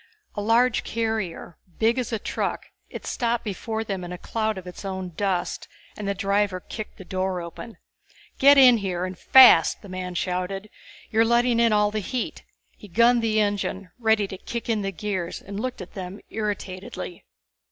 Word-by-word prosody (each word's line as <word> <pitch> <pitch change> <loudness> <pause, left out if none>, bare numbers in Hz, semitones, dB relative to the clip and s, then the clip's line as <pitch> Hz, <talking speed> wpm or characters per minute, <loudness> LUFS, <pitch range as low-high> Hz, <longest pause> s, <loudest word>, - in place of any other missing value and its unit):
A 205 - -3
large 230 +3 +3
carrier, 220 -7 -3 0.2
big 230 +3 +2
as 245 - -3
a 225 - 0
truck, - - -3 0.2
it - - -8
stopped 235 -1 -1
before 220 +1 -3
them 195 -4 -4
in 175 - -7
a 180 - -5
cloud 220 +2 -2
of 185 - -8
its 180 +2 -9
own 190 -2 -4
dust 180 +1 -2 0.3
and 210 - -5
the 200 - 0
driver 200 -1 +1
kicked 215 +3 -8
the 190 - -11
door 185 0 -2
open. 170 +6 -9 0.6
"Get 280 +1 +7
in 255 -3 +8
here 185 -3 -2
and 185 0 -5
fast!" 260 +6 +7
the 200 - -11
man 185 -1 -5
shouted. 185 +3 -3 0.4
"You're 225 +1 +4
letting 235 +1 +3
in 230 -1 +4
all 210 0 +3
the 215 - -1
heat." 245 +4 -4 0.3
He 210 - -13
gunned 235 +5 +4
the 220 -1 +1
engine, 200 -3 -1
ready 220 -3 +2
to 190 - -7
kick 235 0 -5
in 220 -2 +1
the 195 0 -2
gears, 190 -2 -3
and 200 +1 -7
looked 255 -2 -4
at 185 - -10
them 190 +1 -7
irritatedly. 195 -4 -5
205 Hz, 185 wpm, -25 LUFS, 185-225 Hz, 0.6 s, in